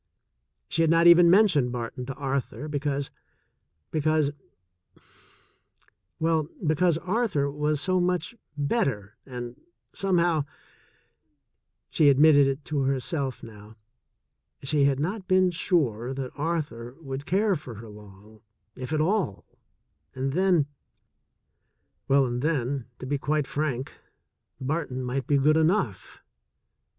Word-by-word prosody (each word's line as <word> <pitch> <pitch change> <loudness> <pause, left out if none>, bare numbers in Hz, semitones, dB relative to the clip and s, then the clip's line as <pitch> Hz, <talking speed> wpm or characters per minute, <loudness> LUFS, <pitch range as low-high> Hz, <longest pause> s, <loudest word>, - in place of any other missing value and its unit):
She 165 - 0
had 165 - +3
not 165 +1 +4
even 170 0 +8
mentioned 175 - +4
Barton 125 +1 -5
to 135 - -5
Arthur 140 +1 -3
because 145 -1 -2 0.4
— 80 -2 -50
because 155 -1 +1 1.0
— - - -38
well, 160 -1 +1 0.2
because 160 +2 +2
Arthur 180 -6 0
was 150 +1 -1
so 185 +4 +1
much 180 +4 0 0.2
better, 140 - -1
and 120 -2 -7 0.3
somehow 175 -6 +1 1.5
(she 150 -2 +5
admitted 145 0 +6
it 135 +1 -3
to 150 -2 -1
her 135 0 +1
self 135 -1 -3
now) 110 -1 -12 0.9
she 140 +1 +2
had 140 -1 +2
not 185 +6 -3
been 185 -1 +4
sure 135 - 0
that 130 -2 -5
Arthur 145 -6 -3
would 140 -2 -6
care 200 +2 +2
for 130 -7 -8
her 110 +2 -10
long, 105 0 -15 0.3
if 130 +2 -7
at 155 -1 +1
all, 165 - 0 0.7
and 135 +1 -2
then 180 -3 +3 0.7
— - - -50
well, 140 0 +4
and 120 0 -3
then, 140 -4 -1
to - - -8
be 140 +2 -1
quite 150 0 0
frank, 135 -3 -3 0.7
Barton 130 -2 -3
might 125 +1 -3
be 145 - +3
good 150 +3 +4
enough. 160 - 0
145 Hz, 130 wpm, -26 LUFS, 130-165 Hz, 1.5 s, even